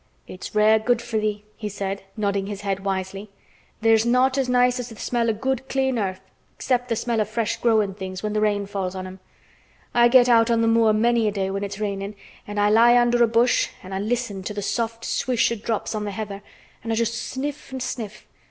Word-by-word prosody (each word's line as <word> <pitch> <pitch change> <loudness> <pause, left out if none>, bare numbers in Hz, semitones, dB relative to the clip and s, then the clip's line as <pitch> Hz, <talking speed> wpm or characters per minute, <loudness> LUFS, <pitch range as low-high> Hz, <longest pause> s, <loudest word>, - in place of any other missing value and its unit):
"It's 185 +3 -9
rare 215 +1 +5
good 240 +2 +1
for 235 -1 -3
thee," 210 -1 -2
he 215 -2 -5
said, 195 0 -4 0.2
nodding 200 -2 -1
his 205 -1 -6
head 195 -2 -2
wisely. 195 +1 -4 0.5
"There's 225 -1 +4
naught 250 +2 +3
as 270 -2 0
nice 250 0 +3
as 245 0 -5
th' 225 - -11
smell 235 0 0
o' - - +2
good 265 +4 -2
clean 265 -2 0
earth, 190 -2 -3 0.3
except 250 -1 -1
th' 230 - 0
smell 235 -1 0
o' - - +1
fresh 220 +1 -2
growin' 215 -4 +2
things 185 -1 -7
when 210 0 -2
th' - - -1
rain 205 -1 +1
falls 195 -2 -4
on 185 0 -5
'em. 185 +1 -9 0.7
I 240 0 +6
get 245 0 +6
out 230 -1 +5
on 230 -1 +2
th' 225 - +3
moor 225 -1 +4
many 230 +1 +2
a - - +1
day 195 -1 -2
when 195 +1 -3
it's 200 0 -5
rainin' 200 -1 -3 0.3
an' 205 0 -6
I 205 0 +3
lie 235 +2 +6
under 240 0 +4
a - - +5
bush 235 +2 +2
an' 195 +3 -4
listen 235 -5 -2
to 210 +2 -6
th' 205 - -3
soft 230 0 -2
swish 245 -2 +1
o' - - 0
drops 220 +1 -3
on 210 -1 -3
th' 200 - -4
heather 205 -1 -5 0.4
an' 225 - -3
I - - +1
just 230 0 0
sniff 275 +5 -5
an' 260 - -4
sniff. 230 -4 -5
220 Hz, 225 wpm, -23 LUFS, 200-240 Hz, 0.7 s, I